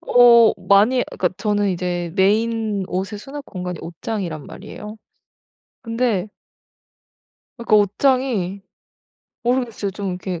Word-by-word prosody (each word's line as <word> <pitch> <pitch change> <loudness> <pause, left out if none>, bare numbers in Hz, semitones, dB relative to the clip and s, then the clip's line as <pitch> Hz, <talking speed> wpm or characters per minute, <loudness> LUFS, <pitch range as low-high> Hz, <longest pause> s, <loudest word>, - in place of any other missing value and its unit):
어 235 -2 +6 0.2
많이 215 +6 +5
그니까 180 - 0
저는 205 -2 0
이제 175 -1 -2
메인 215 0 +1
옷의 195 +3 -3
수납공간이 205 -9 -7
옷장이란 170 -3 -5
말이에요. 210 +1 -9 0.9
근데 230 -4 -1 1.3
그러니까 235 -2 +3
옷장이 205 -2 +1 0.8
모르겠어요. 240 -4 -1
좀 200 0 -5
이렇게 180 -1 -5
205 Hz, 260 characters per minute, -21 LUFS, 185-230 Hz, 1.3 s, 어